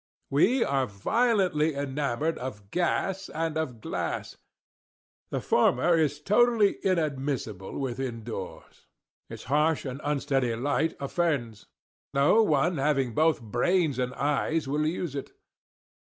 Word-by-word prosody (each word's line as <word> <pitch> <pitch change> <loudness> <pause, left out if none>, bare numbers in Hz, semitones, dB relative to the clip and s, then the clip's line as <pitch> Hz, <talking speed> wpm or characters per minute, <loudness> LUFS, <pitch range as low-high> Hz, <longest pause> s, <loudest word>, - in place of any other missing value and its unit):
We 225 - +4
are 135 -2 0
violently 170 - +1
enamoured 140 +2 -2
of 105 -6 -7
gas 185 +2 -1
and 160 0 -2
of 130 -8 -3
glass. - - -4 0.9
The - - -2
former 130 +8 +3
is 150 -3 +1
totally 215 +4 +3
inadmissible 140 - -2
within 125 -3 -3
doors. 105 -4 -8 0.4
Its - - -8
harsh 150 +4 +1
and 135 +2 -5
unsteady 135 -4 0
light 145 +6 0
offends. 140 - -2 0.5
No 140 +11 +5
one 160 -3 +2
having 135 -4 +1
both 155 -1 +2
brains 140 - +1
and 125 0 -1
eyes 150 +2 0
will 150 +2 0
use 165 -2 -3
it. 140 -2 -6
145 Hz, 120 wpm, -27 LUFS, 130-165 Hz, 0.9 s, No